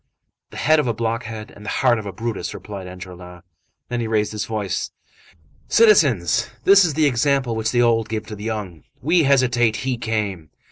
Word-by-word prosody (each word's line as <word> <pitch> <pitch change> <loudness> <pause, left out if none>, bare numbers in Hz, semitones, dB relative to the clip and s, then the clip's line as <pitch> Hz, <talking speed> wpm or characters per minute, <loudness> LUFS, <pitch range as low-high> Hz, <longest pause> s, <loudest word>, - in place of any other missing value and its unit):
"The - - -11
head 155 +1 +3
of 150 - 0
a 115 - -1
blockhead 115 -1 -4
and 105 - -14
the 105 - -5 0.2
heart 120 -2 +4
of 105 - -7
a - - -4
Brutus," 110 +3 -4
replied 100 -3 -8
Enjolras. 90 -1 -11 0.4
Then 120 - -3
he 115 - -2
raised 105 -1 0
his 105 -2 -3
voice:— 105 -4 -3 0.8
"Citizens! 145 - +4
This 200 0 +7
is 160 -5 0
the 155 -1 +3
example 135 -2 +1
which 110 0 -1
the 120 0 +2
old 115 -1 +2
give 110 -1 -3
to 105 - -8
the 105 +1 -8
young. 100 - -5 0.2
We 165 +2 +3
hesitated, 125 -5 +2
he 130 -2 -2
came! 105 -9 -3
110 Hz, 190 wpm, -21 LUFS, 105-125 Hz, 0.8 s, This